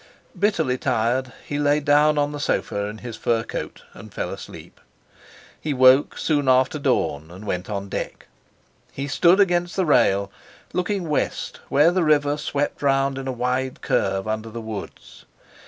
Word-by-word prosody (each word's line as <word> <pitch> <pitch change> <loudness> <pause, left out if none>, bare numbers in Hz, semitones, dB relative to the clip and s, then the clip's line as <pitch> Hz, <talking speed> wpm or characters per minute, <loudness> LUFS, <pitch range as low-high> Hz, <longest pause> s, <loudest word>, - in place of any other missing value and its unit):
Bitterly 160 -11 +1
tired, 125 +1 0
he 145 - -3
lay 145 0 +3
down 150 +1 +3
on 145 0 +1
the 145 - -6
sofa 100 -7 -1
in 105 +1 -6
his 120 -2 -5
fur 115 0 0
coat - - -6
and - - -12
fell - - -4
asleep. - - -10 0.8
He 150 -2 -2
woke 130 +2 +5
soon 145 -4 +1
after 130 +4 +3
dawn 80 - 0
and 95 +5 -11
went 90 -1 -3
on 100 -1 -4
deck. - - -5 0.7
He 140 +1 -5
stood 175 +7 +4
against 175 -2 +2
the 190 - +1
rail, 100 -9 +3 0.4
looking 180 -1 -1
west 150 -2 -2
where 150 +5 +5
the 180 -1 +1
river 145 -2 +3
swept 145 -1 -2
round 135 -1 +1
in 135 - -6
a - - -1
wide 125 +1 -2
curve 95 +1 0
under 110 +1 -3
the 115 +1 -7
woods. 110 -3 -9
135 Hz, 165 wpm, -23 LUFS, 115-150 Hz, 0.8 s, woke